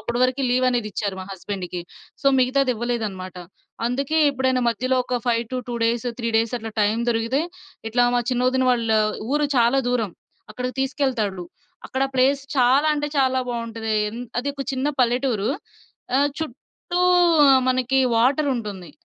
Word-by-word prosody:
అప్పుడి 235 0 -3
వరకీ 260 +2 0
లీవనేదిచ్చారు 235 -6 0
మా 185 - -8
హస్బెండ్‌కి. 185 -2 -5 0.4
సో, - - -1
మిగతాదివ్వలేదనమాట. 240 -8 -1 0.5
అందుకే 275 +6 0
ఎప్పుడైనా 260 -1 0
మధ్యలో 255 +4 -1
ఒక 250 - -3
5-2 240 +1 -2
డేస్, 235 +1 -1
3 230 -1 -2
డేసట్లా 225 -1 -2
టైం 215 +3 +1
దొరికితే, 230 +4 +1 0.5
ఇట్లా 245 +2 +3
మా - - +3
చిన్న 250 0 +1
ఒదిన 260 0 +1
వాళ్ళ 230 -2 +1 0.4
ఊరు 295 0 +2
చాలా 240 +3 +4
దూరం, 225 -6 0 0.4
అక్కడికి 250 0 -4
తీసుకెళ్తాడులు. 255 -9 -1 0.4
అక్కడ 265 - -2
ప్లేస్ 265 +2 +3 0.2
చాలా 260 +4 +4
అంటే 295 0 -2
చాలా 260 -1 +3
బావుంటది. 230 -2 -3 0.2
ఎన్ 230 +3 -7 0.2
అదొక 280 +2 -3
చిన్న 265 +2 -1
పల్లెటూరు, 245 -3 +1 0.7
ఆహ్, 285 +1 +3
చుట్టూ 320 +4 -5 0.7
మనకి 255 +1 +1 0.2
వాటరుంటుంది. 235 - 0
245 Hz, 130 wpm, -23 LUFS, 225-260 Hz, 0.7 s, చాలా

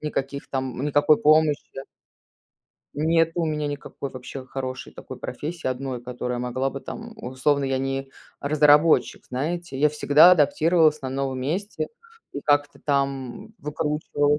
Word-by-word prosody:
никаких, 140 -2 -4
там, 130 -2 -3
никакой 145 +1 +3
помощи, 155 -1 +3
да. 135 - -6 1.1
Нет 165 +2 +2
у 170 - 0
меня 150 -1 -1
никакой 145 -1 -6
вообще 130 +1 -8
хорошей 130 -1 -6
такой - - -10
профессии 165 +1 -6
1, 130 -1 -3
которая 125 0 -4
могла 125 +2 -1
бы 135 - -7
там, 230 +8 -8
условно 130 +3 0
я 135 0 0
не 135 0 -3 0.3
разработчик, 150 +2 +4
знаете. 155 +2 -3
Я 150 - +5
всегда 150 +3 +6
адаптировалась 155 0 +3
на 130 - -3
новом 135 -1 -2
месте 180 +11 -3 0.4
и 140 - -5
как-то 145 0 +1
там 140 -3 -2
выкручивалась. 150 0 0
145 Hz, 140 wpm, -24 LUFS, 135-155 Hz, 1.1 s, всегда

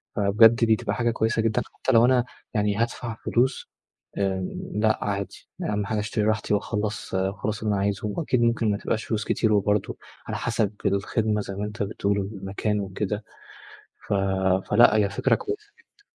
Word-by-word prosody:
فبجد، 105 +3 +6
دي 110 -1 +4
تبقى - - -3
حاجة 120 -1 +1
كويسة 110 0 0
جدًا، 110 -1 +1
حتى - - -1
لو 115 -1 +6
أنا 125 -1 +3 0.3
يعني 105 -2 +1
هادفع 115 +1 -2
فلوس 130 +3 +1 0.5
آمم، 95 -2 -2
لأ، 110 0 +2
عادي. 100 -1 -4 0.2
أهم 105 -1 -1
حاجة، 110 +1 -1
اشتري 105 +1 -1
راحتي، 110 -1 0
وأخلِّص 105 0 -2
وأخلِّص 100 +3 -2
اللي 105 -1 +1
أنا 100 - 0
عايزه. 100 +1 -1
وأكيد، 125 +3 0
ممكن 115 -2 +2
ما 100 - 0
تبقاش 110 +2 -2
فلوس 110 -1 -2
كتير، 110 -2 +1
وبرضه، 105 0 +1 0.3
على - - -3
حسب 110 -3 0
الخدمة 105 +2 +1
زي 100 -1 -6
ما 100 +2 -3
أنت 105 0 -3
بتقول، 100 0 -1
والمكان 100 +1 -2
وكده. 100 +2 -3 0.8
ف - - 0 0.6
فلأ، 120 0 +6
هي 105 -2 +3
فكرة 100 - +2
كويسة 420 -2 -6
جدًا. 420 -3 -29
105 Hz, 170 wpm, -25 LUFS, 100-115 Hz, 0.8 s, فبجد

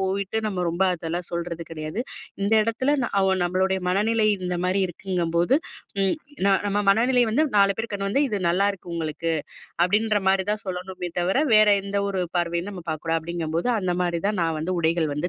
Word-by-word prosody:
போயிட்டு 195 +2 -1
நம்ம 185 -4 -2
ரொம்ப 175 +3 -1
அதெல்லாம் 170 +1 -4
சொல்றது 170 0 -3
கிடையாது. 155 +5 -4 0.4
இந்த 200 - 0
இடத்துல 260 +6 +1 0.2
அ - - +3 0.2
நம்மளுடைய 190 +2 +1
மனநிலை 215 +4 +2 0.2
இந்த 180 0 -1
மாரி 185 +2 +1
இருக்குங்கும்போது 175 +2 0 0.5
ம். 195 -1 +2 0.3
நா 200 - +5
நம்ம 205 0 0
மனநிலை 245 +4 +3
வந்து 300 +8 +3
4 200 0 +5
பேர் 225 +1 -4
கண்ண 195 -1 -2
வந்து 275 +8 +2
"இது 210 -4 -1
நல்லாயிருக்கு 185 -1 0
உங்களுக்கு" 165 0 -2 0.5
அப்படின்ற 210 +3 +2
மாரிதான் 195 +2 +1
சொல்லணுமே 180 -1 -5
தவிர, 185 +7 +1 0.2
வேற 215 0 +6
எந்த 200 0 -4
ஒரு 190 -2 -1
பார்வையும் 170 +3 -1
நம்ம 180 -4 -8
பார்க்கக்கூடாது. 165 +1 -1
அப்படிங்கும்போது 170 +5 -2
அந்த 185 -3 -1
மாரிதான், 180 +3 -1
நான் 165 -1 0
வந்து 180 +3 -2
உடைகள் 160 -2 +1
வந்து 150 +5 -2
185 Hz, 170 wpm, -24 LUFS, 170-205 Hz, 0.5 s, வேற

